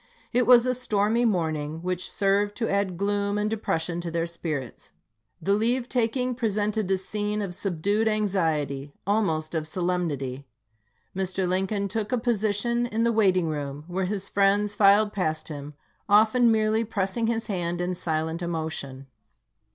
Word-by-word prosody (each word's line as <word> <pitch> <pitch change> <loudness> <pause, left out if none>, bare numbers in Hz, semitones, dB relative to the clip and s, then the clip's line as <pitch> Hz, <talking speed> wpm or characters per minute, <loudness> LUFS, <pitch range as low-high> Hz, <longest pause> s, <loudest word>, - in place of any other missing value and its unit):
It 245 +1 +2
was 245 -1 +7
a 255 - +2
stormy 230 -1 +1
morning, 160 -5 -1
which 180 0 -3
served 200 +1 +1
to 230 - 0
add 200 -3 0
gloom 200 +1 0
and 210 0 0
depression 175 -6 -2
to 170 - -4
their 165 0 -1
spirits. 155 -6 -5 0.5
The 195 +4 +1
leave 235 +4 +1
taking 250 +1 0
presented 215 -3 -1
a 190 - +3
scene 210 +2 -2
of 195 -4 -3
subdued 200 +4 0
anxiety, 160 -10 0
almost 175 -7 0
of 155 -2 -2
solemnity. 155 -7 -2 0.7
Mr. 190 0 -1
Lincoln 195 +2 0
took 210 +3 -3
a 250 - +2
position 235 +1 0
in 225 0 -1
the 235 - +3
waiting 185 -6 +3
room, 145 -2 -4
where 180 +2 -2
his 195 0 -3
friends 200 +1 +2
filed 205 +1 +5
past 160 -5 -1
him, 145 -1 -7 0.3
often 225 +3 +5
merely 220 0 +2
pressing 215 +1 -1
his 230 0 -1
hand 175 -4 -2
in 180 +1 -1
silent 160 -1 -2
emotion. 160 -6 -4
195 Hz, 150 wpm, -26 LUFS, 170-215 Hz, 0.7 s, was